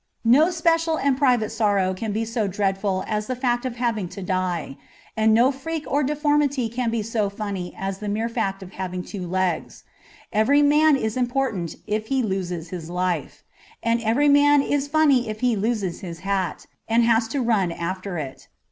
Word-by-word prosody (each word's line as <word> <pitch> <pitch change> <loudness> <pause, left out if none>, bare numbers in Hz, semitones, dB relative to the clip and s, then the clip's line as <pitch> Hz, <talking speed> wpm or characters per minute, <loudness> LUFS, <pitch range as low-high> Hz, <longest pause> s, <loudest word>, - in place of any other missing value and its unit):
No 280 +9 +6
special 330 -2 +1
and 280 -2 +2
private 250 -6 +2
sorrow 205 -4 +1
can 210 +3 -4
be 220 +2 -1
so 225 -2 -1
dreadful 195 0 -1
as 210 -1 -2
the 255 - -2
fact 245 -1 0
of 245 - -6
having 230 -6 -1
to 195 - -8
die. 180 -6 -2 0.4
And 220 0 +3
no 240 +5 +5
freak 315 +3 -5
or 285 - +1
deformity 290 -3 +1
can 235 +1 -1
be 225 -1 -1
so 215 -2 -1
funny 200 -3 -5
as 195 0 -4
the 210 - -4
mere 220 +3 -1
fact 195 -5 -2
of 185 - -11
having 185 -2 -4
two 185 -3 -6
legs. 185 -2 -2 0.5
Every 275 +8 +4
man 300 +1 +5
is 220 -3 -2
important 245 -8 -1
if 215 +1 -2
he 265 0 +1
loses 180 -5 -3
his 170 -2 -7
life; 180 0 -2 0.4
and 230 0 +1
every 230 +6 +2
man 290 0 +5
is 285 0 0
funny 285 -6 +3
if 215 0 -6
he 250 -2 +2
loses 205 -4 -1
his 170 -3 -8
hat, 195 -2 -2 0.2
and 230 +1 +3
has 230 0 +3
to 275 +5 -2
run 220 -8 +1
after 185 +2 -4
it. 140 -4 -7
220 Hz, 185 wpm, -23 LUFS, 190-260 Hz, 0.5 s, No